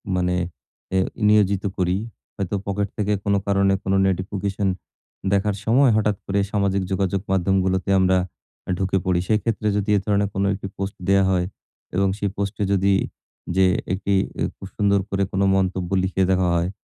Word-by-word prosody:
মানে 90 0 +1 0.6
এ - - +4 0.3
নিয়োজিত 100 -2 +3
করি। 90 0 +1 0.4
হয়তো 100 0 -2
পকেট 100 0 -1
থেকে 105 -1 +1
কোন 100 - +1
কারণে 100 -1 +3
কোন 95 - 0
নোটিফিকেশন 95 +1 -1 0.7
দেখার 100 +1 +1
সময় 125 +3 +5
হঠাৎ 105 -2 +1
করে 100 +1 0
সামাজিক 100 -2 +1
যোগাযোগ 95 0 0
মাধ্যমগুলোতে 95 0 +1
আমরা 95 0 +3 0.5
আ - - -9
ঢুকে 95 0 0
পড়ি। 90 -1 +2
সেক্ষেত্রে 110 0 0
যদি 105 +1 -2
এ - - +2
ধরনের 100 -1 +1
কোনো 100 +1 0
একটি 95 0 -5
পোস্ট 100 0 -4
দেয়া 100 0 +5
হয়। 90 -1 +1 0.5
এবং 95 +1 +3
সেই 100 -1 -1
পোস্টে 100 +1 -2
যদি 100 0 +3 0.6
যে 95 0 +5 0.3
একটি 100 +1 -1 0.3
এ - - +2
খুব 95 - -9
সুন্দর 100 -1 +3
করে 100 0 0
কোন 95 - 0
মন্তব্য 95 -2 0
লিখে 95 0 +1
দেওয়া 95 -1 +2
হয়, 85 +1 +1
95 Hz, 165 wpm, -22 LUFS, 95-100 Hz, 0.7 s, সময়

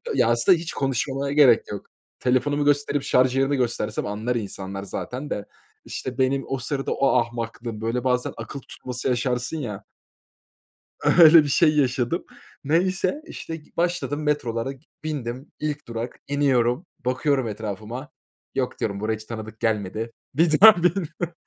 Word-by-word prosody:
Ya - - +4
aslında 120 +10 +4
hiç 165 0 -5
konuşmama 135 +1 -1
gerek 135 -6 +5
yok. 100 - -6 0.3
Telefonumu 145 +3 +1
gösterip, 145 -1 +2
şarj 125 0 +3
yerini 135 +1 +2
göstersem 115 -3 -1
anlar 110 +4 -2
insanlar 100 -3 -5
zaten 125 +8 -5
de. 100 - -3 0.4
İşte 130 0 -5
benim 135 +1 +1
o 135 - -1
sırada 135 +2 -3
o 140 - +2
ahmaklığım. 115 -1 -2
Böyle 115 +2 -1
bazen 125 -1 0
akıl 140 - -6
tutması 125 -1 -6
yaşarsın 125 +3 0
ya. 115 -10 -5 1.2
Öyle 165 -2 +8
bir - - -3
şey 155 +2 +4
yaşadım. 130 +2 +1 0.4
Neyse, 185 - +1
işte, 165 - -6
g 155 -2 -14
başladım 155 -4 -1
metrolara, 130 -5 -1
k - - -26 0.2
bindim. 135 -3 -4
İlk 150 -3 -3
durak 115 +1 -5
iniyorum, 135 0 +2 0.2
bakıyorum 130 0 +1
etrafıma, 110 +5 -5 0.5
"Yok," 130 -2 -2
diyorum, 100 -2 -2
"buraya 110 +1 -1
hiç 110 - -10
tanıdık 110 -1 -7
gelmedi." 110 +1 -1 0.2
Bir 155 +2 +3
daha 220 0 +11
biniyorum. 175 -1 -1
130 Hz, 145 wpm, -24 LUFS, 115-150 Hz, 1.2 s, daha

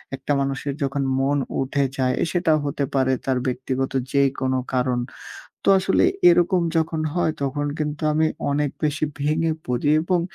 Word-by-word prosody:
একটা 135 +2 -5
মানুষের 135 +1 -2
যখন 140 0 -1 0.2
মন 140 +2 +1 0.2
উঠে 140 +1 0
যায়, 130 -1 +1 0.2
সেটা 175 -2 +1
হতে 140 0 -2
পারে 130 -1 +2
তার 130 -1 +1
ব্যক্তিগত 130 +1 -2 0.2
যে 140 - +3 0.2
কোন 130 0 0 0.2
কারণ। 125 -1 +1 0.7
তো - - +1
আসলে 190 - +2 0.2
এরকম 180 - +4
যখন 160 0 0
হয়, 175 -3 +1
তখন 145 +2 -1
কিন্তু 150 0 -3
আমি 160 +1 +2 0.2
অনেক 145 0 0
বেশি 155 +1 0 0.2
ভেঙে 155 +2 +1
পড়ি 125 +3 -1
এবং 180 0 +1
140 Hz, 155 wpm, -23 LUFS, 130-155 Hz, 0.7 s, এরকম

